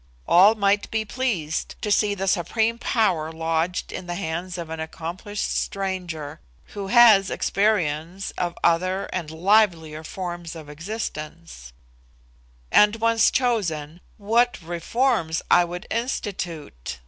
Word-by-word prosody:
All 195 +6 +6
might 205 -1 +1
be 220 0 -1
pleased 200 -10 -2
to 210 - -1
see 205 0 +2
the 195 0 -3
supreme 220 +6 +1
power 180 -12 +1
lodged 165 +2 -2
in 180 - -7
the 175 - -3
hands 175 +1 -4
of 165 -2 -6
an 160 - -5
accomplished 170 +6 -4
stranger 175 -6 -3 0.3
who 200 -1 -5
has 215 -3 +6
experience 185 -3 0
of 175 -1 -3
other 185 +3 +2
and 170 -4 -3
livelier 165 -3 +2
forms 175 -1 -6
of 155 -2 -10
existence; 155 - -7 1.0
and 210 +1 +5
once 230 0 +3
chosen, 175 - -1 0.2
what 235 +4 +2
reforms 170 0 0
I 175 - +6
would 175 +2 -7
institute! 175 - -4
180 Hz, 125 wpm, -24 LUFS, 160-210 Hz, 1.0 s, All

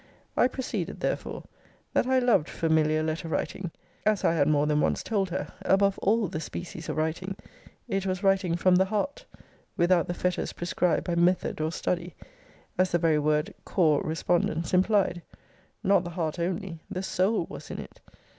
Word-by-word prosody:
I - - +5
proceeded 220 -8 -4
therefore - - -3 0.5
That - - +2
I 260 0 +3
loved 245 -11 +3
familiar 155 -1 +2
letter 160 +1 -2
writing, 170 +3 -2 0.3
as 215 -2 +2
I - - +4
had 145 -4 +2
more 150 -1 +3
than 150 0 +2
once - - +1
told 200 -4 0
her, 185 +2 -4
above 195 0 +3
all 215 +1 +2
the 155 - -4
species 165 0 -6
of - - -3
writing: 165 +5 -2 0.5
it 195 0 -1
was 185 +1 -2
writing 195 -3 +3
from 180 +1 +4
the 190 - +4
heart, 215 +8 -2 0.5
(without 175 0 +3
the 175 - -2
fetters 180 0 -1
prescribed 175 -1 0
by 175 - -2
method 175 -1 +2
or 155 +1 0
study,) 175 -1 -2 0.6
as 185 0 +3
the 175 - +3
very 160 -3 +3
word 150 +1 +1
cor 155 -6 +2
respondence 165 0 0
implied. 185 -1 +3 0.6
Not 195 -3 +4
the 175 - -5
heart 165 -1 -3
only; 175 0 -3
the 185 - -4
soul 190 0 +1
was - - -9
in - - -5
it. - - -9
175 Hz, 175 wpm, -27 LUFS, 160-195 Hz, 0.6 s, I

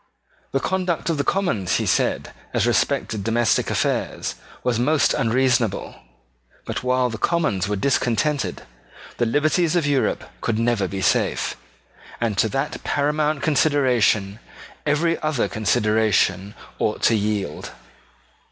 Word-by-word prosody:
The 135 - +1
conduct 180 +1 -1
of 155 - -2
the - - +2
Commons, 155 - 0
he - - 0
said, - - 0 0.2
as - - +2
respected 105 -3 0
domestic 115 +2 +1
affairs, - - -1 0.3
was 120 -2 0
most 150 +4 +3
unreasonable 120 -2 +1 0.7
but - - -3
while 125 -1 +1
the 110 - -6
Commons 105 - 0
were 105 - -1
discontented 130 +4 0 0.5
the 120 - +1
liberties 155 +6 +2
of 170 -4 +2
Europe 140 -2 +1 0.2
could 115 - -1
never 115 -4 +1
be 95 +1 -5
safe; - - +1 0.6
and 115 -3 0
to 110 - +3
that 135 +4 -3
paramount 150 0 0
consideration 125 -9 +2 0.5
every 165 +3 +1
other 155 -5 0
consideration 105 -2 +1 0.2
ought 110 - -1
to - - +5
yield. 105 -7 -2
125 Hz, 125 wpm, -22 LUFS, 105-150 Hz, 0.7 s, to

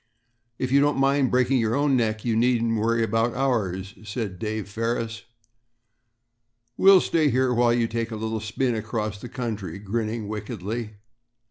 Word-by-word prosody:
"If 130 -1 -2
you 140 - +5
don't 145 0 +2
mind 135 -1 +3
breaking 130 +1 +2
your 115 0 +1
own 145 -1 +2
neck, 110 -2 0
you 115 -2 +1
needn't 115 -1 +2
worry 115 +1 +1
about 115 +1 0
ours," 100 -8 -1
said 105 -4 -5
Dave 110 -1 -3
Ferris; 115 +1 -3 1.5
"we'll 195 -1 +7
stay 155 -3 +2
here 130 0 +2
while 120 0 +3
you 120 -1 +2
take 115 0 -3
a 115 - -5
little 110 +1 -3
spin 115 +4 -1
across 110 -2 -3
country," 115 -7 -5
grinning 110 +2 -3
wickedly. 110 +1 -5
115 Hz, 150 wpm, -25 LUFS, 110-125 Hz, 1.5 s, we'll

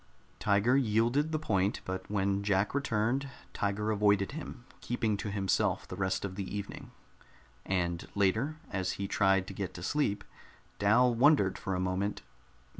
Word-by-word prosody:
Tiger 105 +5 +3
yielded 125 +4 +2
the 155 - +1
point, 100 -9 0
but 95 0 -5
when 100 -1 0
Jack 100 0 +1
returned, 135 0 0 0.2
Tiger 105 +2 -1
avoided 100 -2 +2
him, 140 -4 -8
keeping 115 -3 -1
to 105 - -4
himself 100 -2 0
the - - -6
rest 95 +1 -1
of 95 - -4
the 100 +1 -4
evening. 100 0 -7 0.8
And 85 -3 -1
later, 110 +10 +1 0.2
as 95 -1 -1
he 100 - -4
tried 95 -1 +2
to 95 - -8
get 95 -1 -5
to 90 - -7
sleep, 105 -4 0 0.6
Dal 120 +5 +4
wondered 120 -5 +4
for 95 - -2
a - - -1
moment. 95 +2 -1
100 Hz, 155 wpm, -31 LUFS, 95-120 Hz, 0.8 s, Dal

